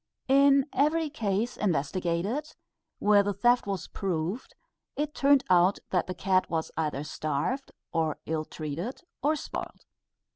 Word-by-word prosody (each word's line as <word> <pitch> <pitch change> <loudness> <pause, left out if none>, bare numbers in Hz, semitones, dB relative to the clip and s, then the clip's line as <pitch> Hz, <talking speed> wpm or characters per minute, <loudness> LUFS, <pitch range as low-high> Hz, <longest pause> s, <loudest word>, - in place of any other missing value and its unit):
_" - - +4
In 275 0 +6
every 305 +3 +2
case 225 -2 -1
investigated, 185 - -1 0.4
where 205 0 +5
the 200 0 -2
theft 240 +3 +3
was 195 -5 -2
proved, 185 +4 -3 0.4
it 300 +1 -2
turned 280 -1 +4
out 180 +1 +4
that 180 -2 +1
the 185 - -4
cat 185 +1 +1
was 160 -1 -2
either 150 -3 -1
starved, 155 - -2 0.2
or 160 -2 0
illtreated, 155 - -4 0.2
or 300 +2 +2
spoiled. - - -6
195 Hz, 135 wpm, -28 LUFS, 165-270 Hz, 0.4 s, In